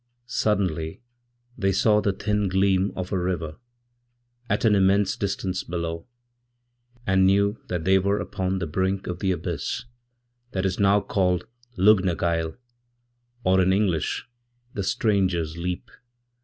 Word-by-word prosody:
Suddenly 95 Hz, -8 st, -1 dB, 0.6 s
they 95 Hz, -3 st, +1 dB
saw 105 Hz, +2 st, +3 dB
the 100 Hz, -, +1 dB
thin 105 Hz, +1 st, -1 dB
gleam 95 Hz, +1 st, +2 dB
of 90 Hz, 0 st, -5 dB
a 95 Hz, -, +1 dB
river, 85 Hz, -3 st, -2 dB, 0.9 s
at -, -, +1 dB
an 110 Hz, -, +5 dB
immensedistance 95 Hz, -1 st, +1 dB
below, 85 Hz, -1 st, -3 dB, 1.0 s
and 95 Hz, 0 st, +3 dB
knew 100 Hz, +2 st, +2 dB
that 90 Hz, -2 st, -2 dB
they 95 Hz, +2 st, +4 dB
were 100 Hz, +2 st, +1 dB
upon 95 Hz, -1 st, -2 dB
the 90 Hz, -, -2 dB
brink 95 Hz, +4 st, -1 dB
of 90 Hz, 0 st, -4 dB
the 95 Hz, -2 st, +1 dB
abyssthat 120 Hz, -, -6 dB
is 95 Hz, 0 st, -1 dB
now 100 Hz, +1 st, +4 dB
called 90 Hz, -2 st, 0 dB, 0.3 s
Lug 100 Hz, +1 st, +5 dB
na 90 Hz, -3 st, +1 dB
Gael, 85 Hz, +1 st, -1 dB, 0.9 s
or 95 Hz, 0 st, +4 dB
in 95 Hz, +1 st, +3 dB
English 95 Hz, -5 st, 0 dB, 0.5 s
the 100 Hz, -, -3 dB
Stranger's 95 Hz, -6 st, +1 dB
Leap. 90 Hz, +1 st, -4 dB
95 Hz, 130 wpm, -25 LUFS, 90-100 Hz, 1.0 s, an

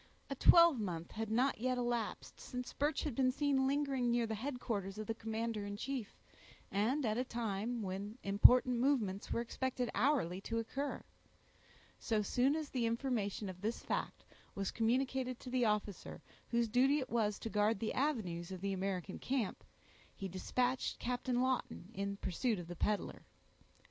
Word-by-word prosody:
A -, -, -1 dB
twelvemonth 220 Hz, -, +5 dB
had 220 Hz, 0 st, -4 dB
not 250 Hz, +4 st, +2 dB
yet 255 Hz, +2 st, 0 dB
elapsed, 240 Hz, -3 st, -2 dB
since 250 Hz, -1 st, -6 dB
Birch 290 Hz, +1 st, 0 dB
had 295 Hz, -, -2 dB
been 255 Hz, +1 st, +3 dB
seen 275 Hz, -1 st, +2 dB
lingering 275 Hz, -3 st, +1 dB
near 235 Hz, 0 st, +2 dB
the 220 Hz, -, -3 dB
headquarters 220 Hz, -5 st, -3 dB
of 215 Hz, -, -4 dB
the 225 Hz, -, -1 dB
commander 225 Hz, -1 st, -3 dB
in 205 Hz, 0 st, -5 dB
chief, 250 Hz, -2 st, -4 dB, 0.5 s
and 240 Hz, +8 st, +1 dB
at 220 Hz, +1 st, +1 dB
a -, -, +2 dB
time 230 Hz, -1 st, -2 dB
when 200 Hz, +4 st, -4 dB
important 245 Hz, +5 st, +6 dB
movements 230 Hz, -8 st, +1 dB
were -, -, +1 dB
expected 250 Hz, +1 st, -2 dB
hourly 210 Hz, -, +1 dB
to 230 Hz, +3 st, -3 dB
occur. 270 Hz, +5 st, -3 dB, 1.0 s
So 220 Hz, -3 st, 0 dB
soon 255 Hz, +7 st, +2 dB
as 310 Hz, -2 st, -4 dB
the 240 Hz, -3 st, +1 dB
information 230 Hz, -4 st, -1 dB
of 185 Hz, -1 st, -7 dB
this 220 Hz, +3 st, -2 dB
fact -, -, -3 dB, 0.3 s
was 195 Hz, -1 st, -2 dB
communicated 255 Hz, +2 st, 0 dB
to 250 Hz, -, -7 dB
the 250 Hz, -2 st, +2 dB
officer 210 Hz, -3 st, -2 dB, 0.3 s
whose 235 Hz, -1 st, +2 dB
duty 260 Hz, +6 st, +4 dB
it 265 Hz, -, -3 dB
was 215 Hz, -3 st, +1 dB
to 225 Hz, -, -5 dB
guard 210 Hz, +1 st, +2 dB
the 225 Hz, -, -1 dB
avenues 195 Hz, -, -1 dB
of 185 Hz, -1 st, -6 dB
the 200 Hz, 0 st, -1 dB
American 190 Hz, 0 st, -3 dB
camp, 255 Hz, -6 st, -2 dB, 0.5 s
he 195 Hz, -, -4 dB
dispatched 245 Hz, +8 st, -1 dB
Captain 250 Hz, 0 st, 0 dB
Lawton 255 Hz, -6 st, -2 dB
in 200 Hz, -1 st, -3 dB
pursuit 215 Hz, +5 st, 0 dB
of 175 Hz, -, -6 dB
the 175 Hz, -, -6 dB
peddler. 210 Hz, +4 st, -1 dB
230 Hz, 165 wpm, -36 LUFS, 205-255 Hz, 1.0 s, important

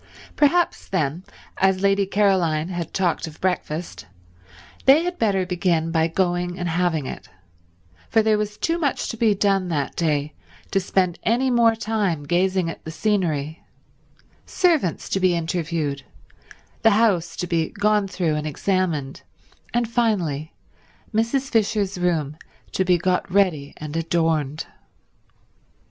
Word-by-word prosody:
Perhaps, 335 Hz, +4 st, +2 dB
then, 165 Hz, -1 st, -1 dB, 0.3 s
as 190 Hz, 0 st, +2 dB
Lady 200 Hz, 0 st, +3 dB
Caroline 185 Hz, -6 st, +2 dB
had 175 Hz, -3 st, -4 dB
talked 180 Hz, -3 st, 0 dB
of 155 Hz, -, -11 dB
breakfast, 175 Hz, -, -3 dB, 0.8 s
they 280 Hz, +5 st, +6 dB
had 355 Hz, 0 st, -4 dB
better 195 Hz, -4 st, +1 dB
begin 175 Hz, -2 st, 0 dB
by 160 Hz, -1 st, +2 dB
going 175 Hz, 0 st, -1 dB
and 175 Hz, -, -3 dB
having 165 Hz, -3 st, 0 dB
it, -, -, -8 dB, 0.8 s
for 225 Hz, -, +3 dB
there 215 Hz, -1 st, +3 dB
was 210 Hz, 0 st, -3 dB
too 335 Hz, +1 st, 0 dB
much 290 Hz, -5 st, -1 dB
to -, -, -4 dB
be 220 Hz, -2 st, +3 dB
done 195 Hz, -2 st, +1 dB
that 150 Hz, -5 st, -2 dB
day 150 Hz, -3 st, 0 dB, 0.4 s
to 195 Hz, -, +2 dB
spend 185 Hz, -2 st, 0 dB
any 255 Hz, +3 st, +1 dB
more 230 Hz, -2 st, +4 dB
time 210 Hz, -8 st, -1 dB
gazing 180 Hz, +3 st, +1 dB
at 165 Hz, -, -7 dB
the -, -, -7 dB
scenery—servants 180 Hz, -, -2 dB
to 195 Hz, -, -1 dB
be 185 Hz, -2 st, +3 dB
interviewed, 165 Hz, -4 st, -2 dB, 0.8 s
the 225 Hz, -, +6 dB
house 200 Hz, -6 st, +2 dB
to 180 Hz, -, -3 dB
be 165 Hz, -2 st, 0 dB
gone 210 Hz, 0 st, +1 dB
through 180 Hz, -4 st, -1 dB
and 150 Hz, 0 st, -2 dB
examined, 160 Hz, -4 st, -1 dB, 0.5 s
and 240 Hz, -1 st, 0 dB
finally 185 Hz, -, 0 dB, 0.6 s
Mrs. 235 Hz, +5 st, +1 dB
Fisher's 205 Hz, -4 st, +1 dB
room 160 Hz, -5 st, 0 dB, 0.3 s
to 190 Hz, -, +1 dB
be 180 Hz, -1 st, +3 dB
got 180 Hz, +1 st, -1 dB
ready 175 Hz, -8 st, +1 dB
and 150 Hz, 0 st, -7 dB
adorned. 160 Hz, -3 st, 0 dB
180 Hz, 135 wpm, -23 LUFS, 160-210 Hz, 0.8 s, they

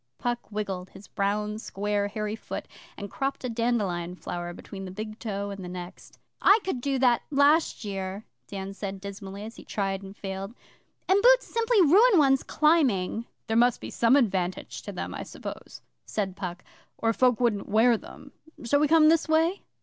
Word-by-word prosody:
Puck 240 Hz, 0 st, -1 dB
wriggled 195 Hz, -4 st, -4 dB
his 195 Hz, 0 st, -14 dB
brown, 210 Hz, +2 st, -1 dB
square, 205 Hz, -1 st, -1 dB
hairy 210 Hz, +1 st, -3 dB
foot, 225 Hz, -, -7 dB, 0.3 s
and 200 Hz, -1 st, -7 dB
cropped 270 Hz, 0 st, -3 dB
a 250 Hz, -, -2 dB
dandelion 205 Hz, -7 st, -1 dB
flower 175 Hz, -1 st, -5 dB
between 195 Hz, +2 st, -9 dB
the -, -, -6 dB
big 215 Hz, +3 st, -7 dB
toe 200 Hz, -2 st, -3 dB
and 195 Hz, -1 st, -7 dB
the 180 Hz, -, -6 dB
next. 180 Hz, 0 st, -9 dB, 0.2 s
'I 400 Hz, -, +7 dB
could 265 Hz, -10 st, -3 dB
do 275 Hz, +1 st, 0 dB
that 245 Hz, -2 st, +3 dB
last 290 Hz, -3 st, +3 dB
year,' 195 Hz, +1 st, -4 dB, 0.2 s
Dan 195 Hz, 0 st, -6 dB
said 195 Hz, -1 st, -5 dB
dismally, 200 Hz, 0 st, -8 dB
as 225 Hz, +2 st, -9 dB
he -, -, -11 dB
tried 195 Hz, -2 st, -2 dB
and 195 Hz, +1 st, -11 dB
failed. 195 Hz, +3 st, -6 dB, 0.5 s
'And 390 Hz, +2 st, +4 dB
boots -, -, +6 dB
simply 460 Hz, -2 st, +2 dB
ruin 400 Hz, -, +6 dB
one's 270 Hz, -3 st, +4 dB
climbing.' 250 Hz, -, +2 dB, 0.2 s
'There 225 Hz, -, 0 dB
must 245 Hz, 0 st, +4 dB
be -, -, -7 dB
some 235 Hz, +3 st, +4 dB
advantage 190 Hz, -9 st, 0 dB
to -, -, -7 dB
them, -, -, -5 dB
I -, -, -5 dB
suppose,'said 195 Hz, -3 st, -7 dB
Puck, 180 Hz, -2 st, -6 dB, 0.3 s
or 225 Hz, 0 st, +1 dB
folk 250 Hz, 0 st, +3 dB
wouldn't 230 Hz, -5 st, 0 dB
wear 225 Hz, +3 st, +5 dB
them. -, -, -11 dB, 0.3 s
Shall 265 Hz, +5 st, +2 dB
we 300 Hz, -, +3 dB
come 315 Hz, 0 st, +6 dB
this 330 Hz, 0 st, +3 dB
way? 325 Hz, +4 st, +2 dB
215 Hz, 180 wpm, -27 LUFS, 195-270 Hz, 0.5 s, I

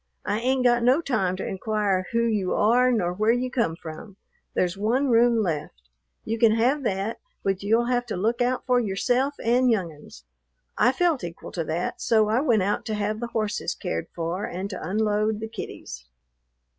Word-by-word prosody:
I 205 Hz, -, 0 dB
ain't 255 Hz, +2 st, +1 dB
got 240 Hz, -1 st, +4 dB
no 255 Hz, +5 st, +4 dB
time 215 Hz, -, 0 dB
to 190 Hz, -, -5 dB
inquire 195 Hz, -2 st, -1 dB
who 230 Hz, 0 st, +2 dB
you 210 Hz, -5 st, 0 dB
are 245 Hz, +4 st, +4 dB
nor 180 Hz, -7 st, 0 dB
where 215 Hz, +4 st, +2 dB
you 250 Hz, +1 st, -1 dB
come 230 Hz, -10 st, 0 dB
from. 165 Hz, +5 st, -10 dB, 0.4 s
There's 180 Hz, 0 st, +1 dB
one 240 Hz, +8 st, +1 dB
room 235 Hz, -1 st, +4 dB
left. 145 Hz, -, -4 dB, 0.4 s
You 225 Hz, +1 st, -2 dB
can 225 Hz, -1 st, +5 dB
have 250 Hz, +6 st, +2 dB
that, 200 Hz, +2 st, -2 dB, 0.2 s
but 195 Hz, -1 st, 0 dB
you'll 225 Hz, +4 st, +2 dB
have 245 Hz, 0 st, 0 dB
to 215 Hz, -, -3 dB
look 225 Hz, +6 st, 0 dB
out 250 Hz, +1 st, 0 dB
for 250 Hz, -1 st, +3 dB
yourself 245 Hz, +6 st, 0 dB
and 245 Hz, +2 st, +3 dB
young 190 Hz, -8 st, +1 dB
'uns." 145 Hz, -, -15 dB, 0.5 s
I 245 Hz, -, +4 dB
felt 320 Hz, -, +1 dB
equal 170 Hz, -1 st, -7 dB
to 170 Hz, -, -2 dB
that; 160 Hz, +3 st, -3 dB
so 220 Hz, -2 st, +3 dB
I 230 Hz, +4 st, +2 dB
went 230 Hz, -9 st, +2 dB
out 205 Hz, +2 st, -1 dB
to 215 Hz, -, -1 dB
have 210 Hz, +1 st, -2 dB
the 240 Hz, -, -3 dB
horses 215 Hz, -3 st, -2 dB
cared 85 Hz, 0 st, -4 dB
for 170 Hz, +3 st, -3 dB
and 190 Hz, +3 st, -5 dB
to 185 Hz, -, -6 dB
unload 215 Hz, +1 st, +1 dB
the 220 Hz, -, -4 dB
kiddies. 195 Hz, -, -8 dB
220 Hz, 195 wpm, -25 LUFS, 190-240 Hz, 0.5 s, can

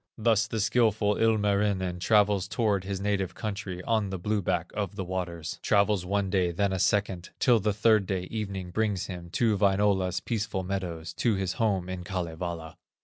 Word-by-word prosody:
Thus 110 Hz, -1 st, +2 dB
the 115 Hz, -1 st, -3 dB
skilful 110 Hz, -1 st, +2 dB
Ilmarinen 100 Hz, -4 st, +1 dB
Travels 100 Hz, -1 st, +3 dB
toward 100 Hz, -4 st, 0 dB
his 100 Hz, -1 st, -3 dB
native 100 Hz, -2 st, -1 dB
country, 100 Hz, -4 st, -5 dB
On 110 Hz, -4 st, +1 dB
the 95 Hz, -, -3 dB
blue 105 Hz, +3 st, -1 dB
back 90 Hz, -2 st, -1 dB
of 100 Hz, -1 st, -3 dB
the 100 Hz, -, -3 dB
waters, 90 Hz, -4 st, -4 dB
Travels 100 Hz, -3 st, +2 dB
one 100 Hz, -1 st, 0 dB
day, 95 Hz, -3 st, +2 dB
then 100 Hz, +3 st, 0 dB
a 95 Hz, -, -1 dB
second, 95 Hz, -3 st, 0 dB
Till 120 Hz, -3 st, +4 dB
the 105 Hz, +1 st, +1 dB
third 105 Hz, -1 st, +3 dB
day 95 Hz, -2 st, -1 dB
evening 95 Hz, -2 st, -5 dB
brings 105 Hz, -2 st, 0 dB
him 90 Hz, -3 st, -7 dB
To 115 Hz, -3 st, +2 dB
Wainola's 95 Hz, -2 st, +2 dB
peaceful 105 Hz, -4 st, -2 dB
meadows, 90 Hz, -4 st, -4 dB
To 115 Hz, -4 st, +2 dB
his 95 Hz, -1 st, -1 dB
home 95 Hz, -5 st, +1 dB
in 95 Hz, -1 st, -5 dB
Kalevala. 85 Hz, -2 st, -5 dB
100 Hz, 175 wpm, -28 LUFS, 90-105 Hz, -, Till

